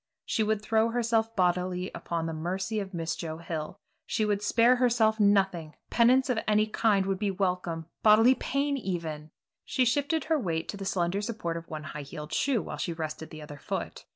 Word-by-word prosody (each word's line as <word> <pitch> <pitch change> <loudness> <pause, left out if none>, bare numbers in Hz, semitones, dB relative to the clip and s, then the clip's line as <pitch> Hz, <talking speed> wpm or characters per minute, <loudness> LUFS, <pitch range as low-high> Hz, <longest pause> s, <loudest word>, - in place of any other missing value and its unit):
She - - 0
would 215 -1 0
throw 220 +1 +2
herself 230 -1 0
bodily 180 -1 0
upon 165 -1 -3
the 165 - -3
mercy 190 +7 -2
of 195 -2 -5
Miss 165 -2 -2
Joe 160 -1 -5
Hill, 160 -2 -5 0.3
she 215 - 0
would 205 -1 0
spare 235 +4 +4
herself 230 -3 +3
nothing; 190 -6 +2 0.2
penance 255 +3 +4
of 250 -4 +1
any 215 0 +4
kind 215 -2 +2
would 195 -1 -1
be 205 -1 0
welcome, 180 -4 -1 0.2
bodily 225 +4 +7
pain 280 +2 -1
even 165 - -4 0.3
She 260 -1 +1
shifted 285 +5 +1
her 315 0 +1
weight 165 -8 -2
to 205 - -4
the 195 - -6
slender 185 +1 0
support 210 -6 -3
of 165 0 -7
one 155 -1 -5
high 150 0 -6
heeled 150 +2 -8
shoe 265 -6 +1
while - - -6
she 170 - -2
rested 160 -1 -5
the 155 -1 -9
other 145 -1 -10
foot. - - -5
195 Hz, 195 wpm, -28 LUFS, 165-225 Hz, 0.3 s, bodily